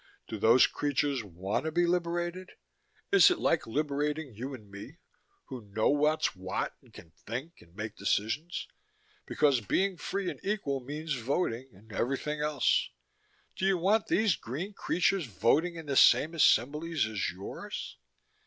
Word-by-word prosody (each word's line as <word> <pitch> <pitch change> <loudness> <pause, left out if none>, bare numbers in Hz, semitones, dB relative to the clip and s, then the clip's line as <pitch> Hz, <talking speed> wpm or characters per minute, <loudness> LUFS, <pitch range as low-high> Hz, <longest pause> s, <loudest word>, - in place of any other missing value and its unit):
Do 110 - -6
those 115 +4 +6
creatures 145 -3 -1
want 95 - -3
to 160 - -1
be 175 +2 +2
liberated? 175 +1 -2 0.6
Is 395 -1 +8
it 360 - +1
like 165 - +1
liberating 145 +2 -2
you 125 +6 -6
and 110 -5 -14
me, 100 0 -10 0.5
who 130 -2 -8
know 105 +1 0
what's 150 -4 +2
what 95 0 -3
and - - -22
can 80 - -14
think 125 - -7
and 85 +1 -20
make 105 0 -6
decisions? 110 - -1 0.6
Because 140 -5 +2
being 190 - 0
free 195 +1 -3
and - - -11
equal 195 -10 -1
means 150 +4 -4
voting 130 0 -2
and 110 +3 -16
everything 135 +7 -2
else. 150 -3 +2 0.7
Do - - -6
you 195 -1 +3
want 200 +5 +2
these 210 -5 +3
green 155 - -6
creatures 180 -3 0
voting 155 - +1
in 165 -1 -8
the 140 -2 -2
same 155 +4 +6
assemblies 150 +1 +2
as 110 -3 -2
yours? 95 +3 -7
145 Hz, 155 wpm, -30 LUFS, 110-170 Hz, 0.7 s, Is